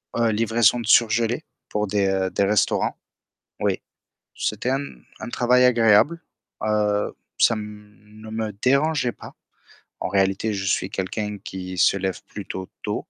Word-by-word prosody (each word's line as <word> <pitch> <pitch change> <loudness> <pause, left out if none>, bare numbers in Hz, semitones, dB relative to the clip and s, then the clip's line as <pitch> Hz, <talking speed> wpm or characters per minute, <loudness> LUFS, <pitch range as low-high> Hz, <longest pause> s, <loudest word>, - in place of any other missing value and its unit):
Heu, 115 -1 +2
livraison 115 +1 +3
de 115 - -5
surgelés 115 +4 +3 0.3
pour 105 0 -1
des 95 -1 +1
des - - +2
restaurants. 105 +1 +1 0.6
Oui. - - 0 0.5
C'était 105 +4 -2
un 135 +2 +1 0.4
un - - -6
travail 125 +1 +3
agréable. 120 +6 +4 0.4
Heu, 105 -1 0 0.2
ça 115 - +4
ne 105 0 -11
me 110 -1 -3
dérangeait 140 0 +2
pas. - - -12 0.7
En - - -2
réalité, 95 +2 +1
je 95 -1 -3
suis 95 0 0
quelqu'un 105 +3 -3
qui 95 -2 -7
se 90 - +4
lève 95 -2 -3
plutôt 95 0 -7
tôt. - - -2
105 Hz, 135 wpm, -23 LUFS, 100-115 Hz, 0.7 s, agréable